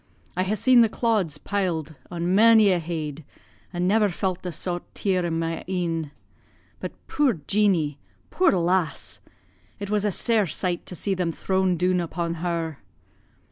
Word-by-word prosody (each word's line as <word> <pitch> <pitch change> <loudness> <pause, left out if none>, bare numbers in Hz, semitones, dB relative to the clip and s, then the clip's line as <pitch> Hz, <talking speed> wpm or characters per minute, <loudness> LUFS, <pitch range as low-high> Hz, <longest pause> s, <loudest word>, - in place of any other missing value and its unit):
I 185 - 0
ha' 195 +3 0
seen 250 +2 +5
the 225 - +4
clods 210 - 0
piled 165 -5 -2
on 175 +1 -1
mony 220 0 +6
a 180 - +2
heid, 160 -2 -4 0.5
and 180 0 -1
never 210 +1 +3
felt 185 0 -2
the 180 - -4
saut 175 +2 -3
tear 185 -3 0
in 165 -1 -1
my 165 0 -2
e'en. 165 -4 -1 0.7
But, - - -5
puir 290 -5 +2
Jeanie! 180 -9 +2 0.3
puir 370 -2 +3
lass. 175 -3 0 0.6
It 200 0 -6
was 210 -1 +1
a 210 - +1
sair 220 0 +2
sight 175 +1 -2
to 180 - -6
see 195 +4 0
them 180 -3 -1
thrown 190 +1 0
doon 180 +1 +2
upon 170 0 -3
her." 165 -4 -2
180 Hz, 160 wpm, -25 LUFS, 165-200 Hz, 0.7 s, mony